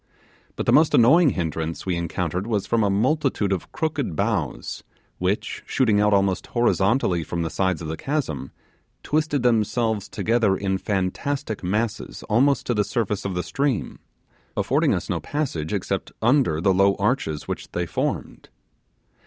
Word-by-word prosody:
But - - -3
the - - +3
most 155 +1 +5
annoying 150 +7 +6
hindrance 80 - -3
we 90 -2 0
encountered 85 +2 -2
was 105 -4 0
from 115 -2 +1
a 100 - +2
multitude 115 -1 +1
of 95 - -5
crooked 150 - -2
boughs, - - -2 0.4
which, - - -1
shooting 110 -6 +2
out 105 0 +3
almost 95 -2 +1
horizontally 110 -6 +2
from 85 +1 -3
the 80 - -3
sides 95 -4 0
of - - -5
the 80 - -3
chasm, 100 - -3 0.5
twisted 150 -3 0
themselves 110 -2 +1
together 110 -4 +1
in 95 -1 -1
fantastic 105 +5 -2
masses 105 +4 -2
almost 135 +6 +2
to 120 - 0
the 105 -2 +2
surface 105 0 -2
of 95 -2 -2
the 90 - -1
stream, 135 - -1 0.6
affording - - +2
us - - -4
no - - -1
passage 125 - -3
except - - -2
under 120 - +3
the 95 +3 +3
low 100 +1 +4
arches 100 - -1
which - - -5
they - - -1
formed. - - -3
105 Hz, 155 wpm, -23 LUFS, 90-125 Hz, 0.6 s, annoying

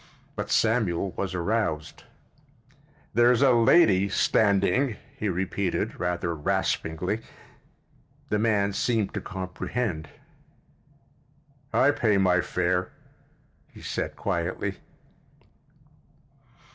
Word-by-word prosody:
But - - -4
Samuel 105 -5 +1
was 90 +1 -4
aroused. 90 -4 -2 1.1
"There's 120 +3 +4
a 135 - +6
lady 115 - +5
standing," 105 +6 +2 0.2
he 105 - -2
repeated, 95 0 -2
rather 90 -1 -1
raspingly. 80 +5 -1 1.1
The 105 - +1
man 105 -3 +1
seemed 110 -2 0
to - - -3
comprehend. 95 -2 -4 1.6
"I 145 - +4
pay 110 -7 +1
my 90 -2 +3
fare," - - -1 0.8
he - - -14
said - - -3
quietly. 90 +2 -3
100 Hz, 85 wpm, -26 LUFS, 90-115 Hz, 1.6 s, a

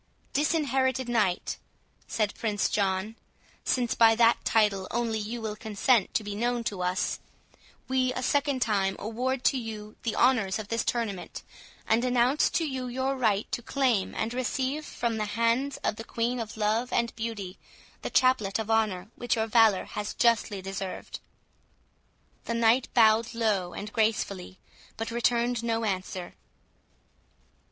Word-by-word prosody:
"Disinherited 265 -4 +1
Knight," 215 -7 0 0.5
said 215 -3 0
Prince 210 -3 -1
John, 200 +2 -1 0.5
"since 245 -3 +1
by 225 -1 +6
that 230 0 +4
title 205 -4 +2
only 230 -2 -1
you 225 +3 -4
will 215 -1 -3
consent 220 +1 +1
to 220 - +1
be 205 -1 -5
known 240 +3 -1
to 200 -4 -3
us, 180 +2 -1 0.7
we 260 -1 +1
a 255 - -4
second 280 -1 +1
time 195 -3 +1
award 250 +4 -2
to 265 - +3
you 215 -2 -7
the 230 - -2
honours 225 -7 +3
of 215 -2 -7
this 230 0 0
tournament, 225 -6 -3 0.4
and 225 +2 +3
announce 250 +3 +3
to 330 - 0
you 260 -2 -4
your 260 +2 -1
right 220 -5 +1
to - - -2
claim 245 -5 0
and 230 - -2
receive 265 +4 -2
from 235 -2 -2
the 215 - -1
hands 235 +5 +1
of 210 - 0
the 225 - -6
Queen 235 +2 -2
of 220 -1 -6
Love 220 +3 0
and 235 -1 0
Beauty, 220 -5 -5 0.4
the - - -4
Chaplet 220 -6 +3
of 220 0 -3
Honour 215 -3 0
which 245 - 0
your 220 -1 0
valour 225 -3 +4
has 210 0 -5
justly 225 -4 +2
deserved." 195 0 -5 1.3
The 235 - -2
Knight 230 +2 +3
bowed 225 0 +4
low 205 -6 0
and 210 +1 -6
gracefully, 205 -4 -1 0.4
but 225 +1 -4
returned 235 0 +1
no 230 -1 0
answer. 185 -2 -3
225 Hz, 150 wpm, -28 LUFS, 210-245 Hz, 1.3 s, by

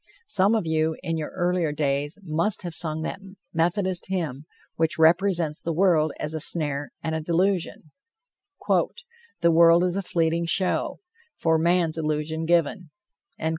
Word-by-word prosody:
Some 215 - +2
of 215 - -1
you 160 0 0
in 165 -2 -2
your 155 - -4
earlier 175 -3 0
days 145 +1 -1
must 170 +6 0
have 175 -2 -5
sung 160 -1 -1
that 190 - -4 0.3
Methodist 175 +2 0
hymn 160 -6 -3 0.3
which 160 -1 0
represents 165 -1 +2
the 165 - -2
world 160 -3 +3
as 150 +1 -2
a 160 - -3
snare 145 -3 -1
and 160 - -2
a 160 - -2
delusion: 175 -1 -1 0.8
"The 465 - -1
world 170 +1 +6
is 180 +1 +1
a - - 0
fleeting 170 -2 0
show 185 +2 0 0.4
For 160 -1 +2
man's 170 -1 +2
illusion 155 +1 -2
given." 170 +1 +1
165 Hz, 145 wpm, -25 LUFS, 155-180 Hz, 0.8 s, world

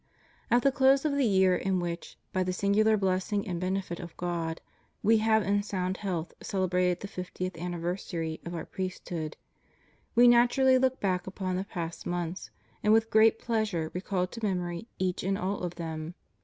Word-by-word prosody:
At 240 0 +4
the 275 - +5
close 270 +2 +4
of 305 - +2
the 280 -3 +2
year 190 -2 +4
in 185 +1 0
which, 170 -1 -5 0.2
by 185 - +1
the 185 0 0
singular 210 +3 +3
bless 190 0 0
ing 205 -1 0
and 175 -3 -2
benefit 185 -2 -2
of 170 -2 -9
God, 170 -2 -2 0.4
We 220 +2 +5
have 220 0 +3
in 205 +1 +2
sound 190 -2 -2
health 175 -5 -3
cele 190 -2 -1
brated 180 0 +1
the 200 - -5
fiftieth 185 -1 -5
anniversary 170 -1 -3
of 170 0 -6
Our 165 - -4
priesthood, 175 -4 -5 0.8
We 240 +1 +7
naturally 245 +2 +5
look 260 0 +1
back 185 -2 0
upon 190 -1 -3
the 190 +2 -2
past 170 -5 -5
months, 175 0 -3 0.3
and 210 - +3
with 225 0 +3
great 220 +1 +6
pleasure 215 -9 -1
recall 180 0 -1
to 225 +5 -10
memory 180 0 -2
each 185 -1 -1
and 195 +1 0
all 195 +2 -2
of 175 -1 -4
them. 160 0 -5
185 Hz, 185 wpm, -29 LUFS, 175-215 Hz, 0.8 s, We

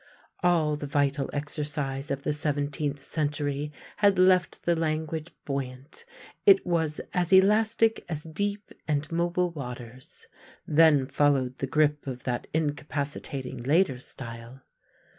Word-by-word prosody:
All 165 -4 +3
the 145 - -5
vital 140 -1 +1
exercise 145 -1 -3
of 140 0 -3
the 150 - 0
seventeenth 145 -1 -1
century 145 -1 -1 0.3
had 200 -2 +4
left 185 -1 +3
the 170 - +2
language 160 0 -2 0.2
buoyant; 135 - -5 0.4
it 390 -2 +6
was 160 -3 0
as 180 -1 +1
elastic 220 +3 +4
as 155 -2 -3
deep 200 +6 -2 0.2
and 150 0 -1
mobile 175 +1 +1
waters; 125 -4 -7 0.4
then 155 -3 +5
followed 135 -2 +1
the 135 - -2
grip 150 -1 +1
of 125 -2 -5
that 120 -1 -2
incapacitating 145 -3 -3
later 145 +1 +2
style. 120 +1 -8
150 Hz, 125 wpm, -27 LUFS, 140-165 Hz, 0.4 s, it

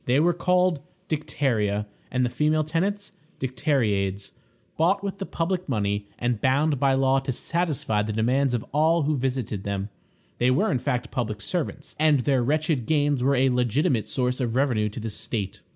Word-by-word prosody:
They 125 +3 +3
were 175 +3 +3
called 180 -2 +2 0.3
Dicteria, 110 -9 0 0.2
and 125 0 +1
the 120 - -2
female 155 +4 +2
tenants 195 +7 -2 0.3
Dicteriades. 105 - 0 0.4
Bought 190 +5 +2
with 195 -1 -4
the 195 - -4
public 180 +1 -2
money, 105 -3 -1
and 120 -3 -1
bound 140 +2 +2
by 135 -1 +3
law 135 0 +3
to 135 0 -3
satisfy 145 -7 -1
the 105 +1 -2
demands 125 +4 +1
of 115 - -3
all 160 +2 +3
who 150 +1 +1
visited 125 -6 -2
them, 100 0 -3 0.5
they 125 - +3
were 150 +13 +2
in 130 - +1
fact 125 -2 -2
public 110 -4 -2
servants, 170 - -4
and 155 -3 +4
their 135 0 +2
wretched 150 -2 0
gains 145 -3 +2
were 140 +1 +3
a 130 +1 +3
legitimate 125 - +1
source 125 0 -1
of 120 -2 -1
revenue 120 -6 +2
to 105 - -7
the 110 0 -4
state. 105 -1 -4
130 Hz, 175 wpm, -25 LUFS, 115-155 Hz, 0.5 s, and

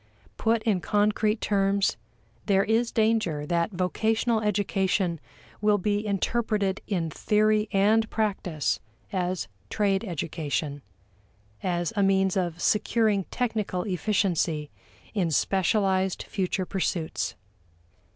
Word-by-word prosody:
Put 225 0 +1
in 205 -6 +1
concrete 210 +2 +1
terms, 195 -1 +2 0.5
there 195 -2 +4
is 230 +2 +1
danger 215 -10 +1
that 170 +3 +1
vocational 220 +5 0
education 190 -4 0 0.4
will 210 0 +4
be 205 +2 0
interpreted 205 -1 0
in 170 -6 -1
theory 215 +4 +2
and 215 +3 +3
practice 190 -8 -1 0.3
as 180 -7 -1 0.2
trade 200 -1 +1
education: 155 -5 -3 0.8
as 175 0 -1
a 205 - +2
means 195 -1 +3
of 175 -3 -1
securing 210 -1 +2
technical 215 -7 -2
efficiency 180 -6 0 0.4
in 190 -6 +1
specialized 190 +3 +1
future 185 -1 -2
pursuits. 175 -3 -2
195 Hz, 100 wpm, -27 LUFS, 180-215 Hz, 0.8 s, there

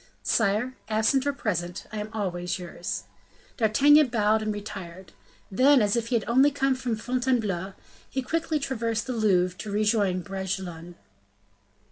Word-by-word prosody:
"Sire, 225 +4 +1 0.2
absent 225 +6 +2
or 285 - +1
present, 180 -8 -3
I 215 - -4
am 210 +1 -5
always 180 -5 -3
yours." 170 - -5 0.5
D'Artagnan 280 +7 +5
bowed 220 -2 +2
and 215 0 -1
retired. 190 -4 -8 0.4
Then, 265 +7 +5
as 205 -1 +2
if 230 -1 -1
he 240 - 0
had 225 - 0
only 260 +5 +5
come 270 -1 +1
from 255 -3 -2
Fontainebleau, 220 -6 -1 0.4
he 265 - -3
quickly 320 +2 -1
traversed 230 -5 -2
the 255 - -3
Louvre 185 -5 +2
to 215 - -6
rejoin 205 -3 +1
Bragelonne. 185 -3 -5
215 Hz, 145 wpm, -26 LUFS, 190-250 Hz, 0.5 s, D'Artagnan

